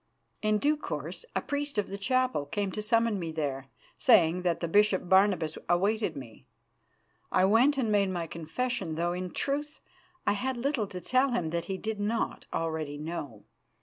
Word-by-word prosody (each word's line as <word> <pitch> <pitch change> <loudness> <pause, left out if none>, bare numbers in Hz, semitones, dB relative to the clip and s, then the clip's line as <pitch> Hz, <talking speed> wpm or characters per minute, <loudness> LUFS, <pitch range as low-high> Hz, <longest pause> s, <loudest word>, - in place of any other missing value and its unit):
In 215 0 +2
due 295 +6 +2
course 395 - -5
a - - 0
priest 285 -3 -2
of 205 - +1
the 200 - -4
chapel 255 - +1
came 200 +5 -2
to 210 - -3
summon 225 -1 +2
me 165 -2 -4
there, 140 -4 -3 0.3
saying 180 -8 +5
that 175 -2 0
the 170 - -2
Bishop 205 0 +3
Barnabas 190 -4 +3
awaited 200 0 +1
me. 130 -1 -11 0.8
I 185 - +4
went 240 +8 +4
and 235 -5 +1
made 200 -2 +3
my 175 -2 -2
confession, 170 +3 -3
though 170 +2 0
in 180 0 -4
truth 290 - -2 0.5
I 205 - +3
had 255 +5 -2
little 245 -4 0
to 185 -2 -7
tell 255 +8 +2
him 165 -9 -1
that 170 0 -2
he 190 - -3
did 220 +1 -4
not 215 +3 -2
already 160 -3 -2
know. 150 -8 -6
195 Hz, 180 wpm, -29 LUFS, 165-230 Hz, 0.8 s, saying